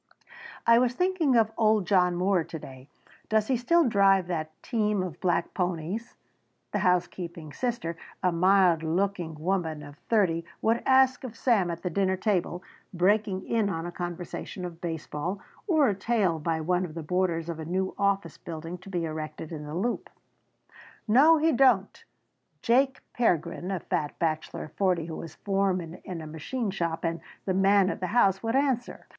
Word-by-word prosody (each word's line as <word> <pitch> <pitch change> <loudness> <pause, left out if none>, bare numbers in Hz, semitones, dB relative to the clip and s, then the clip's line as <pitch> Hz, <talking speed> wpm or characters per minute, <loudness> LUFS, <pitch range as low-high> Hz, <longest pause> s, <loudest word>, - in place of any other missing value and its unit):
"I 230 0 +6
was 245 0 +1
thinking 360 -6 +2
of 225 -1 +4
old 215 -3 +3
John 180 -2 +3
Moore 180 0 +2
to 165 0 -7
day 130 -2 -12 0.4
does 220 -1 +3
he 260 - +3
still 325 +6 +3
drive 195 -4 +4
that 160 -3 -3
team 210 -5 0
of 175 -3 -6
black 180 -2 0
ponies?" 180 +5 -3 0.6
the - - 0
housekeeping 175 -3 -1
sister, 235 -10 -2 0.3
a 180 - +3
mild 180 -1 +4
looking 175 0 -1
woman 160 -2 -2
of 145 0 -12
thirty, 185 -7 +2 0.2
would 225 +1 +1
ask 260 -1 +4
of 240 -3 -7
Sam 210 -8 +2
at 170 0 -5
the 180 - -2
dinner 190 +1 +1
table, 185 -3 -1 0.3
breaking 195 +2 +1
in 220 -3 +1
on 165 -3 -3
a 175 - -4
conversation 175 +1 -6
of 170 -2 -8
baseball, 165 +2 -4 0.3
or 315 -7 +4
a 205 - +2
tale 195 -4 0
by 160 +1 -1
one 180 +3 +1
of 165 -3 -6
the 165 - -5
boarders 170 0 0
of 165 -2 -5
a - - -4
new 185 +3 -1
office 200 -5 0
building 165 +2 -7
to 195 - -12
be 175 -3 -1
erected 155 0 -6
in 150 -2 -6
the 150 +1 -6
Loop. 230 +7 -2 1.0
"No, 285 +9 +6
he 320 +1 +3
don't," 245 -8 +3 0.6
Jake 265 +3 +2
Pergrin, 180 -5 0
a 190 -2 -1
fat 150 -1 -2
bachelor 155 -2 -2
of 155 - -11
forty 180 -5 +1
who 165 -1 -6
was 160 -2 -8
foreman 190 -4 -1
in 175 -3 -6
a - - -7
machine 195 - -3
shop 170 -3 -2
and 165 0 -2 0.2
the 190 - 0
man 195 0 +4
of - - -6
the 185 - -2
house, 195 -3 +3
would 225 +2 -1
answer. 265 -3 0
185 Hz, 175 wpm, -27 LUFS, 165-215 Hz, 1.0 s, I